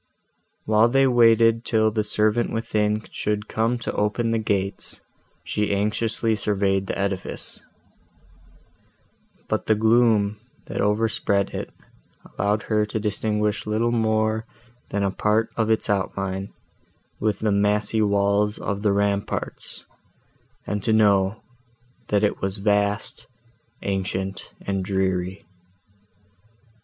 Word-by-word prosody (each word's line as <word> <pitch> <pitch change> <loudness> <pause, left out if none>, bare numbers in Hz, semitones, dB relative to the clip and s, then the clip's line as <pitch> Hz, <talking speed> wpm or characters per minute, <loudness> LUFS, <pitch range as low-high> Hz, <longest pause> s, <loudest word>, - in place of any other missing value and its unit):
While 110 +2 +4
they 135 +2 +4
waited 115 -2 +4
till 110 -2 +2
the 110 0 0
servant 110 +2 +2
within 105 -1 0
should 105 0 -2
come 115 +2 0
to 120 - -4
open 105 +3 0
the 115 - +1
gates, 100 -2 -2 0.4
she 105 -1 -1
anxiously 110 +2 0
surveyed 100 -2 0
the - - -3
edifice: 100 -2 -4 1.9
but - - -2
the 110 - +4
gloom, 110 -2 +3 0.3
that - - -3
overspread 105 -1 +1
it, - - -5 0.5
allowed 105 +1 -1
her 105 -1 +1
to 105 +1 -3
distinguish 105 0 -1
little 110 +2 +1
more 110 -1 +1 0.4
than 100 0 -1
a 100 - +1
part 110 +3 +1
of 110 -1 0
its 110 - +2
outline, 95 -1 -2 0.7
with 105 -2 0
the 110 -1 +1
massy 105 +2 +1
walls 100 0 +2
of 100 -1 -3
the 105 -2 +2
ramparts, 100 0 -1 0.8
and 105 0 -2
to 110 - 0
know, 100 -1 +3 0.6
that 105 0 +1
it 105 - 0
was 95 +1 -2
vast, 100 +1 0 0.6
ancient 95 0 -3
and 95 -1 -1
dreary. 95 -1 -1
105 Hz, 120 wpm, -23 LUFS, 100-110 Hz, 1.9 s, While